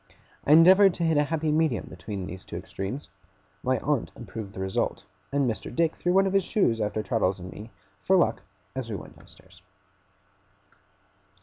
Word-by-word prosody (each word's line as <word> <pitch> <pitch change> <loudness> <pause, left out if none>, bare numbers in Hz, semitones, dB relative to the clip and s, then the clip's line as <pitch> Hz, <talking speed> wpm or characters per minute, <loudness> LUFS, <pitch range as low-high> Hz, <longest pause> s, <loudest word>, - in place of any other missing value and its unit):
I 145 - +7
endeavoured 185 +4 +7
to 170 - -2
hit 160 -2 +2
a 145 - +3
happy 160 0 -1
medium 155 -6 +1
between 100 -4 -6
these 95 +1 -8
two - - -9
extremes; 110 +10 -6 0.5
my 130 0 +1
aunt 145 -4 0
approved 110 -3 -8
the - - -8
result; 95 0 -1 0.3
and 140 -1 +1
Mr. 115 - -3
Dick 165 -1 +2
threw 175 - -1
one 195 +1 +4
of 195 - -1
his 195 -1 +3
shoes 120 - +1
after 105 +1 -1
Traddles 105 -6 0
and 90 0 -9
me, 110 +2 -10 0.3
for - - +3
luck, - - +2 0.3
as - - -4
we - - -3
went - - -9
downstairs. - - -18
135 Hz, 180 wpm, -27 LUFS, 105-165 Hz, 0.5 s, I